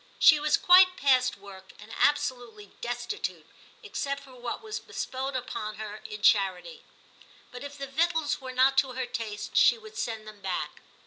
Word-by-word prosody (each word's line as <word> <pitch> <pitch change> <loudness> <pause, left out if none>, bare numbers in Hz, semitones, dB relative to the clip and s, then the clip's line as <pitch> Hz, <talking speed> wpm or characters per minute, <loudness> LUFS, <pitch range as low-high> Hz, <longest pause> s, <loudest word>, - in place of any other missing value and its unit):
She 305 - +7
was 300 +1 +2
quite 365 +1 +6
past 255 -2 +3
work, 195 -1 -13
and 210 +2 -13
absolutely 245 -8 0
destitute, 245 - -4 0.4
except 280 -1 -4
for 265 - -15
what 245 - -6
was 430 -1 -5
bestowed 265 +1 -5
upon 230 -4 -4
her 215 0 -7
in 210 -1 -8
charity, 210 - +2 0.7
but 250 +1 -9
if 285 0 -8
the 275 - -5
victuals 320 +1 0
were 260 -1 -6
not 265 +1 +4
to 265 -2 0
her 260 0 -3
taste 225 -4 -6
she 235 0 +6
would 215 -1 -13
send 220 -1 -4
them 210 -1 -12
back. 180 -6 -4
255 Hz, 170 wpm, -28 LUFS, 215-280 Hz, 0.7 s, She